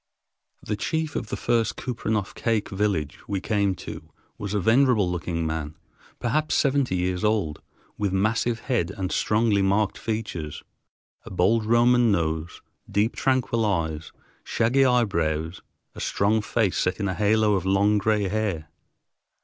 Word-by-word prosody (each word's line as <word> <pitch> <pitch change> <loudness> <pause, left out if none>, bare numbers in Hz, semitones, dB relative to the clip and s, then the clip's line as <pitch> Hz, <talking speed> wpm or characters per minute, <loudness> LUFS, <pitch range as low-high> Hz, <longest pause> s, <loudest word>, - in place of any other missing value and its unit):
The 105 - -2
chief 160 +7 -2
of 115 - -3
the - - -4
first 115 -2 +1
Kupreanof 110 -5 -2
Kake 115 -3 -1
village 95 -7 -1
we 100 -1 -1
came 100 -2 0
to - - -9 0.3
was 100 0 -4
a - - +2
venerable 115 0 +3
looking 85 -1 -2
man, 80 -1 -3 0.4
perhaps 150 +6 0
seventy 135 -7 +2
years 90 +1 -1
old, 105 -8 0 0.4
with 100 -2 0
massive 110 +4 0
head 120 -10 0
and 95 -1 -4
strongly 105 -2 +2
marked 100 +1 +1
features, 105 -9 -4 0.6
a - - -10
bold 105 +5 +2
Roman 120 0 +4
nose, 80 -2 -2 0.3
deep, 105 +3 +1
tranquil 130 -3 +1
eyes, 80 -6 -1 0.3
shaggy 120 +4 +2
eyebrows, 85 -9 0 0.3
a - - -10
strong 105 +2 +1
face 105 -2 0
set 90 +3 0
in 100 - -1
a 95 - -1
halo 105 +1 +2
of 95 -4 0
long 100 +2 +3
gray 105 0 +1
hair. 100 -6 -2
105 Hz, 145 wpm, -25 LUFS, 90-115 Hz, 0.6 s, Roman